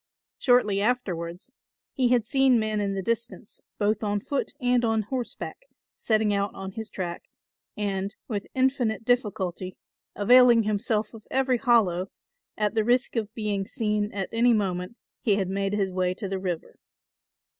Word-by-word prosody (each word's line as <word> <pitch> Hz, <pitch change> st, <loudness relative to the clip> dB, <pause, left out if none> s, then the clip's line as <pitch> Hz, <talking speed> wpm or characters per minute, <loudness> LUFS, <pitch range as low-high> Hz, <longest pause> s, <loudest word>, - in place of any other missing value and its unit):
Shortly 230 Hz, -6 st, +3 dB
afterwards 185 Hz, -4 st, -2 dB, 0.4 s
he 255 Hz, -3 st, +2 dB
had 240 Hz, -2 st, +3 dB
seen 265 Hz, -1 st, +4 dB
men 215 Hz, -1 st, -1 dB
in 200 Hz, -1 st, -1 dB
the 195 Hz, -, -3 dB
distance, 230 Hz, +1 st, -3 dB, 0.2 s
both 210 Hz, +1 st, +1 dB
on 205 Hz, -1 st, 0 dB
foot 280 Hz, +7 st, -2 dB
and 245 Hz, -2 st, +2 dB
on 225 Hz, -1 st, +1 dB
horseback, 260 Hz, -, -5 dB, 0.3 s
setting 215 Hz, -2 st, +1 dB
out 200 Hz, 0 st, 0 dB
on 195 Hz, 0 st, -6 dB
his 220 Hz, +2 st, -6 dB
track 175 Hz, -2 st, -5 dB, 0.5 s
and, 200 Hz, -1 st, -2 dB
with 210 Hz, -4 st, -3 dB
infinite 255 Hz, -4 st, +1 dB
difficulty, 190 Hz, -6 st, -1 dB, 0.4 s
availing 240 Hz, +2 st, +6 dB
himself 215 Hz, +1 st, 0 dB
of 220 Hz, -2 st, -13 dB
every 260 Hz, -2 st, +1 dB
hollow, 195 Hz, -8 st, +3 dB, 0.5 s
at 210 Hz, -1 st, 0 dB
the 220 Hz, -1 st, +2 dB
risk 245 Hz, +4 st, +1 dB
of 220 Hz, -2 st, -1 dB
being 205 Hz, -3 st, -2 dB
seen 210 Hz, -2 st, -1 dB
at 195 Hz, -2 st, -3 dB
any 235 Hz, +1 st, +4 dB
moment 190 Hz, 0 st, -1 dB, 0.2 s
he 215 Hz, -6 st, +3 dB
had 195 Hz, -2 st, -1 dB
made 195 Hz, +1 st, -1 dB
his 195 Hz, -2 st, 0 dB
way 185 Hz, 0 st, 0 dB
to 200 Hz, -, -5 dB
the 190 Hz, 0 st, -3 dB
river. 180 Hz, -3 st, -4 dB
210 Hz, 155 wpm, -26 LUFS, 195-240 Hz, 0.5 s, availing